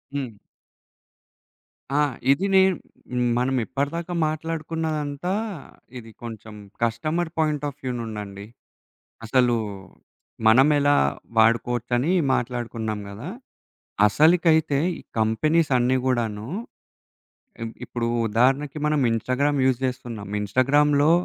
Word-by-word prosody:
హ్మ్. 130 -7 -4 1.6
ఆ! - - +3 0.3
ఇది 140 +8 +2
నేను 190 -1 +5 0.6
మనం 130 +2 +1
ఇప్పటిదాకా 165 +7 -3
మాట్లాడుకున్నదంతా 155 0 -3 0.6
ఇది 115 -2 -10
కొంచెం 110 -2 -8 0.3
కస్టమర్ 155 +9 -1
పాయింట్ 150 -2 0
ఆఫ్ 145 -1 -7
వ్యూ 130 - -2
నుండండి. 105 -3 -7 0.8
అసలు, 125 +1 +3 0.9
మనం 130 +6 +6
ఎలా 145 0 +4 0.4
వాడుకోవచ్చని 120 +5 +2 0.2
మాట్లాడుకున్నాం 115 -4 -2
గదా! 110 - -7 0.8
అసలకైతే 160 - +3 0.2
ఈ - - -12 0.2
కంపెనీస్ 155 +9 +2
అన్నీ 125 +1 +2
గూడాను. 115 -4 -1 1.1
ఇ - - -2 0.2
ఇప్పుడు 120 -1 -3 0.2
ఉదాహరణకి 135 +7 +1
మనం 150 -1 +2
ఇన్‌స్టాగ్రామ్ 130 +5 0
యూజ్ 130 -2 +2
జేస్తున్నాం. 120 -5 -5
ఇన్‌స్టాగ్రామ్‌లో 145 +7 +3
130 Hz, 95 wpm, -24 LUFS, 115-150 Hz, 1.6 s, మనం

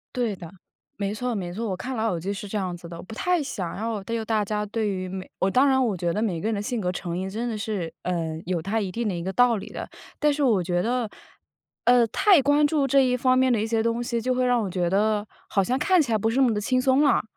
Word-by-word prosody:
对 235 -5 0
的， 170 -3 -10 0.5
没 200 0 -2
错 245 +2 -2
没 180 -5 -4
错， 225 +3 -3
我 190 - -1
看 260 +7 -5
《老 220 +1 0
友 175 - -2
记》 190 +5 -3
是 205 - -6
这 210 - -3
样 185 -3 -2
子 170 -1 -11
的。 170 0 -8
不 220 +4 -10
太 360 +6 +1
想 190 - -4
要 220 -1 -3
对 230 +4 -3
于 220 - -4
大 220 -1 +1
家 210 +1 -2
对 215 0 -1
于 185 -2 -3
每 185 0 -7
我 190 - +2
当 255 +7 +4
然 265 -1 +3
我 220 -5 0
觉 175 -1 -1
得 210 - -1
每 185 -8 -1
个 215 - -1
人 - - 0
的 200 - -2
性 225 +2 -2
格 180 -1 0
成 175 -1 -4
因 190 +1 -3
真 225 +5 -3
的 225 -2 -3
是， 200 -5 -3
嗯， 165 -3 -2
有 175 -1 -1
它 200 +6 -1
一 190 -3 -3
定 230 +3 -2
的 195 - -1
一 170 - -4
个 190 - -2
道 245 +4 +4
理 200 - -6
的， - - -6 0.3
但 295 0 +3
是 290 0 -1
我 225 -8 +3
觉 175 0 0
得， 235 +1 -1 0.8
呃， 245 -1 +6
太 365 - +4
关 290 +2 +4
注 290 -2 +1
这 275 +1 +4
一 250 -1 +2
方 255 +1 +3
面 260 0 +3
的 220 - +1
一 - - 0
些 225 0 0
东 230 +1 0
西， 235 -1 -1
就 255 +2 0
会 255 0 +1
让 245 -1 +3
我 200 - -2
觉 175 -1 0
得 210 +2 +1 0.2
好 195 - +1
像 255 +7 0
看 370 +2 +4
起 265 -6 -2
来 220 - +3
不 220 +2 0
是 225 - -2
那 - - +4
么 230 - +1
地 210 - -1
轻 255 +4 +1
松 265 +2 +3
了。 285 - +3
220 Hz, 320 characters per minute, -25 LUFS, 190-250 Hz, 0.8 s, 呃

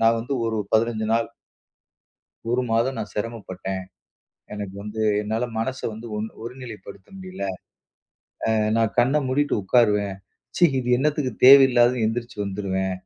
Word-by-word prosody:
நான் 115 0 +4
வந்து 125 +5 -5
ஒரு 110 -1 -1 0.2
15 110 -1 +1
நாள் 115 0 +1 1.2
1 125 +2 +1
மாதம் 120 +4 +1
நான் 105 - -5
சிரமப்பட்டேன். 95 -4 -5 0.7
எனக்கு 100 -2 -6
வந்து, 105 +1 -5 0.2
என்னால 110 +3 -2
மனசு 130 +4 -3
வந்து 110 +2 -9
ஒன் 110 - -3 0.2
ஒருநிலை 125 -2 -8
படுத்த 100 -1 -12
முடில. 185 - -9 1.1
அ - - +3 0.2
நான் 115 -2 +1
கண்ண 130 +5 +4
மூடிட்டு 145 +3 +1
உட்காருவேன். 105 -2 +2 0.4
ச்சீ! - - +4
இது 125 - -3
என்னத்துக்கு 140 -2 0
தேவையில்லாததுன்னு 125 -3 +7
எந்திரிச்சி 120 +1 -4
வந்துருவேன். 95 -1 -2
115 Hz, 135 wpm, -23 LUFS, 105-125 Hz, 1.2 s, தேவையில்லாததுன்னு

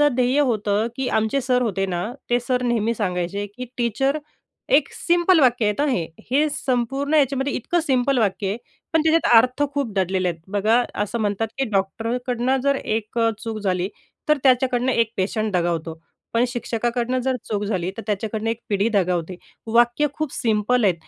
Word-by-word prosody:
ध्येय 255 +3 +2
होतं, 215 -5 +1
की 265 0 -2
आमचे 220 +5 +1
सर 250 -1 +1
होते 200 -5 0
ना, 175 -2 -2 0.3
ते 240 0 +3
सर 250 +1 -1
नेहमी 230 -2 +1
सांगायचे, 190 -1 -2
की 235 +5 -8
टीचर 255 +4 +1 0.6
एक 275 -2 -1
सिम्पल 345 0 +3
वाक्य 245 -6 +3
आहे 265 - +1 0.3
हे 295 +4 +3
संपूर्ण 270 +1 -1
याच्यामध्ये, 275 -1 +2
इतकं 345 +8 0
सिम्पल 270 -3 +1
वाक्य 200 -2 0
आहे 200 +3 -2 0.4
पण 320 - +4
त्याच्यात 320 -6 +4
अर्थ 255 +5 +3
खूप 280 -7 -2
दडलेले 190 -1 0
आहेत. 170 -1 -6
बघा, 215 +4 +3 0.2
असं 210 +3 -4
म्हणतात, 210 +1 0
की 270 - +1
"डॉक्टरकडून 235 +5 -1
जर 280 0 +3
एक 220 -2 -3 0.2
चूक 225 -2 -4
झाली, 185 -2 -1 0.4
तर 300 - +5
त्याच्याकडून 255 -1 +3
एक 230 -3 +1
पेशंट 215 +3 -1
दगावतो, 170 -2 -1 0.3
पण 230 +1 +3
शिक्षकाकडून 240 +1 -1
जर 260 +1 0
चूक 210 -2 -1
झाली, 185 -3 -2
तर 225 - -5
त्याच्याकडून 215 +1 -2
एक 230 +1 -2
पिढी 205 +2 +1
दगावते." 180 -4 0 0.4
वाक्य 240 +5 +4
खूप 310 -1 -3
सिम्पल 225 +2 +1
आहे, 190 - +4
235 Hz, 165 wpm, -22 LUFS, 205-255 Hz, 0.6 s, तर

